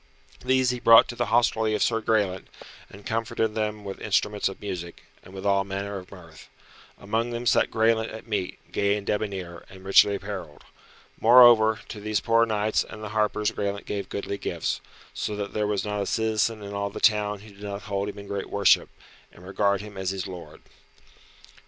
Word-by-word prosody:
These 130 Hz, -1 st, +2 dB
he 125 Hz, -, -4 dB
brought 115 Hz, -1 st, +7 dB
to 120 Hz, -, -5 dB
the 120 Hz, -1 st, -1 dB
hostelry 110 Hz, -1 st, +2 dB
of 105 Hz, -, +1 dB
Sir 115 Hz, -1 st, +1 dB
Graelent, 105 Hz, -4 st, 0 dB, 0.4 s
and 100 Hz, +1 st, -14 dB
comforted 115 Hz, -2 st, -1 dB
them 105 Hz, -1 st, -3 dB
with 95 Hz, -, -7 dB
instruments 105 Hz, -1 st, 0 dB
of 95 Hz, -, -10 dB
music, 90 Hz, -4 st, -6 dB, 0.2 s
and -, -, -15 dB
with 95 Hz, +1 st, -8 dB
all 100 Hz, -1 st, +3 dB
manner 100 Hz, +1 st, -4 dB
of 90 Hz, -1 st, -10 dB
mirth. 85 Hz, -5 st, -14 dB, 0.5 s
Amongst 115 Hz, +4 st, -2 dB
them 120 Hz, +1 st, -4 dB
sat 115 Hz, -, +3 dB
Graelent 110 Hz, 0 st, +1 dB
at 110 Hz, -, -9 dB
meat, 105 Hz, -5 st, -3 dB
gay 100 Hz, 0 st, +1 dB
and 100 Hz, -, -7 dB
debonair, 95 Hz, -5 st, -3 dB
and 95 Hz, 0 st, -13 dB
richly 100 Hz, +1 st, +5 dB
apparelled. 95 Hz, -7 st, -7 dB, 0.6 s
Moreover, 115 Hz, -2 st, +7 dB
to 105 Hz, -, -7 dB
these 105 Hz, 0 st, -1 dB
poor 115 Hz, 0 st, +3 dB
knights 105 Hz, 0 st, +1 dB
and 110 Hz, -, -11 dB
the 105 Hz, -, -5 dB
harpers 105 Hz, 0 st, 0 dB
Graelent 100 Hz, 0 st, -3 dB
gave 100 Hz, -1 st, -4 dB
goodly 100 Hz, 0 st, -4 dB
gifts, -, -, -3 dB, 0.3 s
so 105 Hz, -, -3 dB
that 100 Hz, -1 st, -5 dB
there 105 Hz, -1 st, 0 dB
was 105 Hz, -1 st, -1 dB
not 105 Hz, -1 st, -2 dB
a 100 Hz, -, -3 dB
citizen 110 Hz, 0 st, 0 dB
in 100 Hz, 0 st, -7 dB
all 100 Hz, 0 st, -2 dB
the 100 Hz, -, -8 dB
town 105 Hz, -2 st, +2 dB
who 105 Hz, 0 st, -14 dB
did 100 Hz, -, -18 dB
not 100 Hz, 0 st, -6 dB
hold 100 Hz, 0 st, -2 dB
him 105 Hz, -, -9 dB
in 100 Hz, 0 st, -9 dB
great 100 Hz, -1 st, -4 dB
worship, 100 Hz, -1 st, +3 dB, 0.4 s
and 90 Hz, -, -16 dB
regard 100 Hz, +1 st, 0 dB
him 105 Hz, -1 st, -10 dB
as 95 Hz, -1 st, -2 dB
his 95 Hz, -1 st, -3 dB
lord. 90 Hz, -3 st, -10 dB
105 Hz, 195 wpm, -25 LUFS, 100-110 Hz, 0.6 s, brought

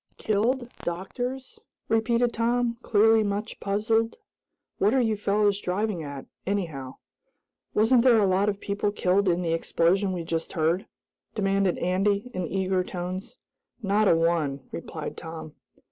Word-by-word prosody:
"Killed? 235 Hz, +4 st, 0 dB
Doctors?" 245 Hz, +9 st, -5 dB, 0.3 s
repeated 235 Hz, +2 st, +2 dB
Tom, 235 Hz, 0 st, 0 dB
clearly 225 Hz, 0 st, +4 dB
much 205 Hz, +1 st, -3 dB
puzzled. 225 Hz, +3 st, 0 dB, 0.6 s
"What 210 Hz, +6 st, +3 dB
are -, -, +4 dB
you 225 Hz, -3 st, +2 dB
fellows 205 Hz, 0 st, +1 dB
driving 195 Hz, 0 st, -1 dB
at, 140 Hz, -3 st, -7 dB, 0.2 s
anyhow?" 160 Hz, -10 st, -3 dB, 0.8 s
"Wasn't 230 Hz, +3 st, +5 dB
there 245 Hz, -2 st, +6 dB
a 210 Hz, -, +4 dB
lot 195 Hz, +2 st, +2 dB
of 200 Hz, -1 st, -3 dB
people 205 Hz, 0 st, -1 dB
killed 195 Hz, 0 st, +2 dB
in 175 Hz, +1 st, +1 dB
the 165 Hz, -1 st, 0 dB
explosion 180 Hz, +4 st, +1 dB
we 175 Hz, -3 st, -4 dB, 0.3 s
heard?" 165 Hz, +4 st, +1 dB, 0.5 s
demanded 195 Hz, -3 st, +1 dB
Andy, 200 Hz, +6 st, 0 dB
in 180 Hz, -2 st, -2 dB
eager 190 Hz, +1 st, 0 dB
tones. 180 Hz, +2 st, -6 dB, 0.5 s
"Not 205 Hz, +1 st, +3 dB
a 170 Hz, -, +6 dB
one," 165 Hz, -4 st, +1 dB
replied 160 Hz, -2 st, -6 dB
Tom. 160 Hz, -2 st, -8 dB
200 Hz, 135 wpm, -26 LUFS, 180-220 Hz, 0.8 s, there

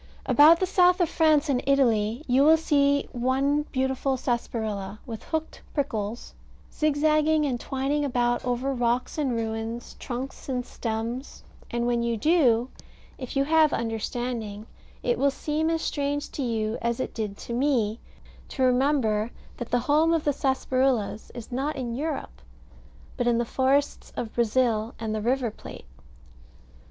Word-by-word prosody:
About 315 Hz, +3 st, +7 dB
the 375 Hz, -, +2 dB
south 360 Hz, 0 st, +4 dB
of 350 Hz, -3 st, +2 dB
France 315 Hz, -2 st, +3 dB
and 260 Hz, -3 st, +1 dB
Italy 235 Hz, -3 st, +2 dB
you 260 Hz, +2 st, +3 dB
will 320 Hz, +2 st, +7 dB
see 285 Hz, -3 st, +2 dB
one 275 Hz, +4 st, +1 dB
beautiful 265 Hz, 0 st, 0 dB
sarsaparilla, 220 Hz, -5 st, -3 dB
with 225 Hz, -2 st, -7 dB
hooked 320 Hz, -1 st, -4 dB
prickles, 230 Hz, -6 st, -3 dB, 0.4 s
zigzagging 305 Hz, +1 st, +2 dB
and 250 Hz, -4 st, -1 dB
twining 275 Hz, +4 st, -1 dB
about 240 Hz, -3 st, 0 dB
over 250 Hz, +2 st, -1 dB
rocks 245 Hz, +3 st, -1 dB
and 265 Hz, -5 st, 0 dB
ruins, 225 Hz, +1 st, -4 dB
trunks 260 Hz, +2 st, -6 dB
and 250 Hz, -2 st, -2 dB
stems: 230 Hz, +4 st, -5 dB, 0.3 s
and 235 Hz, 0 st, -1 dB
when 240 Hz, -1 st, +1 dB
you 235 Hz, -1 st, 0 dB
do, 255 Hz, -4 st, +3 dB, 0.5 s
if 255 Hz, 0 st, -7 dB
you 275 Hz, -, +3 dB
have 310 Hz, 0 st, +4 dB
understanding, 225 Hz, -1 st, -3 dB, 0.4 s
it 245 Hz, 0 st, 0 dB
will 280 Hz, +1 st, +4 dB
seem 305 Hz, +3 st, -1 dB
as 325 Hz, 0 st, -1 dB
strange 285 Hz, 0 st, -2 dB
to -, -, -5 dB
you 225 Hz, -3 st, -1 dB
as 235 Hz, +1 st, -1 dB
it -, -, -3 dB
did 210 Hz, -3 st, -4 dB
to 235 Hz, -, -7 dB
me 240 Hz, -4 st, +1 dB, 0.5 s
to 260 Hz, -, -2 dB
remember 250 Hz, -4 st, +2 dB, 0.3 s
that 240 Hz, -, -6 dB
the 245 Hz, -, +1 dB
home 310 Hz, +4 st, +3 dB
of 320 Hz, -, -1 dB
the 290 Hz, -, +2 dB
sarsaparillas 260 Hz, -5 st, 0 dB
is 240 Hz, +1 st, -8 dB
not 275 Hz, +5 st, -2 dB
in 245 Hz, -4 st, -4 dB
Europe, 270 Hz, -, -4 dB, 0.8 s
but 245 Hz, -, 0 dB
in 235 Hz, -1 st, +3 dB
the 235 Hz, -, 0 dB
forests 270 Hz, +4 st, 0 dB
of 225 Hz, -, -4 dB
Brazil, 235 Hz, -1 st, +1 dB
and 220 Hz, -1 st, -3 dB
the 215 Hz, -, -2 dB
River 245 Hz, 0 st, 0 dB
Plate. -, -, -11 dB
255 Hz, 155 wpm, -26 LUFS, 235-285 Hz, 0.8 s, About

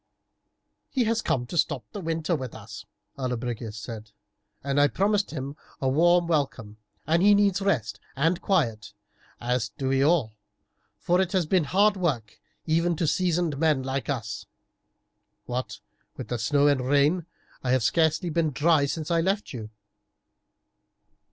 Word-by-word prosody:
"He 260 Hz, -, +1 dB
has 230 Hz, 0 st, +1 dB
come 125 Hz, -, 0 dB
to 165 Hz, +7 st, -3 dB
stop -, -, 0 dB
the 205 Hz, -, -6 dB
winter 165 Hz, 0 st, -1 dB
with 130 Hz, -5 st, -6 dB
us," 105 Hz, -1 st, -10 dB, 0.3 s
Allobrigius 120 Hz, -3 st, -3 dB
said. 110 Hz, -1 st, -8 dB, 0.5 s
"I 140 Hz, +1 st, +3 dB
promised 200 Hz, +5 st, +1 dB
him 140 Hz, -1 st, -5 dB, 0.2 s
a 135 Hz, -, -1 dB
warm 175 Hz, +6 st, +4 dB
welcome, 135 Hz, -10 st, -2 dB, 0.3 s
and 165 Hz, +3 st, +2 dB
he 205 Hz, +1 st, +6 dB
needs 200 Hz, -1 st, +2 dB
rest 110 Hz, -, 0 dB, 0.2 s
and 165 Hz, +6 st, +1 dB
quiet, 115 Hz, -, 0 dB, 0.5 s
as 120 Hz, -2 st, -1 dB
do 135 Hz, -1 st, -1 dB
we 135 Hz, 0 st, +2 dB
all, 145 Hz, -7 st, +2 dB, 0.6 s
for 180 Hz, +2 st, +2 dB
it 185 Hz, 0 st, -2 dB
has 185 Hz, -3 st, +2 dB
been 175 Hz, 0 st, +2 dB
hard 200 Hz, +6 st, +3 dB
work 135 Hz, -, -2 dB, 0.2 s
even 170 Hz, +2 st, +1 dB
to 165 Hz, -, -1 dB
seasoned 170 Hz, -2 st, 0 dB
men 155 Hz, -4 st, +2 dB
like 135 Hz, +1 st, -3 dB
us. 115 Hz, -7 st, -4 dB, 1.0 s
What 120 Hz, -5 st, -4 dB, 0.4 s
with 125 Hz, -2 st, -4 dB
snow 140 Hz, +6 st, +2 dB
and 145 Hz, -3 st, +3 dB
rain 145 Hz, +6 st, +2 dB, 0.4 s
I 130 Hz, -, -2 dB
have 130 Hz, -2 st, +2 dB
scarcely 160 Hz, -, +2 dB
been 160 Hz, 0 st, +1 dB
dry 150 Hz, +1 st, +3 dB
since 155 Hz, +2 st, -4 dB
I 165 Hz, -1 st, +3 dB
left 195 Hz, +2 st, -1 dB
you." 110 Hz, -4 st, -6 dB
145 Hz, 150 wpm, -26 LUFS, 125-175 Hz, 1.0 s, he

